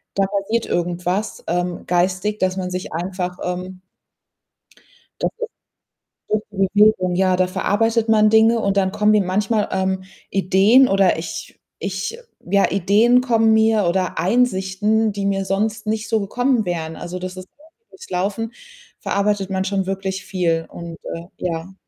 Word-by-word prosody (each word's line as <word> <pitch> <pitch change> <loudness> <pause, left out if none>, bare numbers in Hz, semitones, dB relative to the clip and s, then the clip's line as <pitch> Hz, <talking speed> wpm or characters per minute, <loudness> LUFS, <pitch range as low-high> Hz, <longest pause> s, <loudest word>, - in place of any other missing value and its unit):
da 195 - +2
passiert 200 +4 -1
irgendwas, 180 +4 -2
ähm, 175 +1 -2
geistig, 185 +4 0
dass 185 0 0
man 180 -1 -3
sich 185 0 -5
einfach, 180 +1 -3
ähm 180 +1 -5 1.4
Das - - 0
ist 475 -1 -3 0.8
durch 215 0 0
die 195 -2 0
Bewegung, 205 -4 +4
ja, 185 0 +2
da 185 0 +2
verarbeitet 225 +5 0
man 215 -1 +5
Dinge 225 +1 +5
und 200 -1 0
dann 190 -1 +2
kommen 210 0 +3
mir 210 - +4
manchmal, 205 +3 0
ähm, 190 0 -1 0.3
Ideen 195 +7 +4
oder 195 -4 +3
ich 165 0 -7 0.2
ich 195 - -4 0.3
ja, 200 +3 +2
Ideen 210 +6 +4
kommen 225 -3 +3
mir 220 -2 +3
oder 185 0 -1
Einsichten, 210 0 +1
die 200 0 -3
mir 195 -1 0
sonst 210 +3 -1
nicht 220 0 -2
so 220 -2 +1
gekommen 245 +3 0
wären. 160 -3 -3
Also, 180 +1 -6
das 185 0 -6
ist 185 0 -9
gerade 315 +2 -22 0.2
durchs 380 - -14
Laufen 205 +5 -2 0.5
verarbeitet 200 -1 0
man 190 0 -1
schon 195 -1 -1
wirklich 195 0 -3
viel 165 -3 -1
und, 170 -1 -8 0.2
äh 165 0 -6
ja. 175 +1 -4
195 Hz, 155 wpm, -20 LUFS, 185-215 Hz, 1.4 s, man